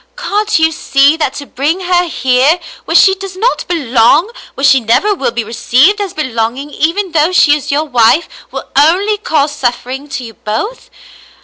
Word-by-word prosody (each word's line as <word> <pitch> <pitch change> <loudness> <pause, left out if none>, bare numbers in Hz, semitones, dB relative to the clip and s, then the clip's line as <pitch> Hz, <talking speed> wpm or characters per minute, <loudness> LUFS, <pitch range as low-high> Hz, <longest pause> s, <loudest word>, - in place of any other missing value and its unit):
"Can't 425 +1 -1
you 320 0 +2
see, 280 -1 +2
that 295 -4 -2
to 285 - -7
bring 300 +8 -2
her 360 -1 +1
here, 265 +3 +1 0.3
where - - -3
she 385 - +6
does 385 -1 -8
not 475 +6 -1
belong 285 - +2
— - - -20
where 275 - -7
she 270 -2 +5
never 245 - +1
will 275 - -2
be 235 0 -3
received 260 - +1
as 395 -3 -4
belong 235 -5 -2
ing, 285 +2 -8
even 355 +6 -1
though 320 +1 +1
she 300 -5 +4
is 295 - -5
your 295 +2 +1
wife 250 +3 +2
— - - -23
will - - -7
only 370 +9 +2
cause 305 -10 0
suffering 265 +1 -4
to 270 -2 -5
you 225 -1 -10
both 225 - -5
295 Hz, 195 wpm, -12 LUFS, 260-365 Hz, 0.3 s, she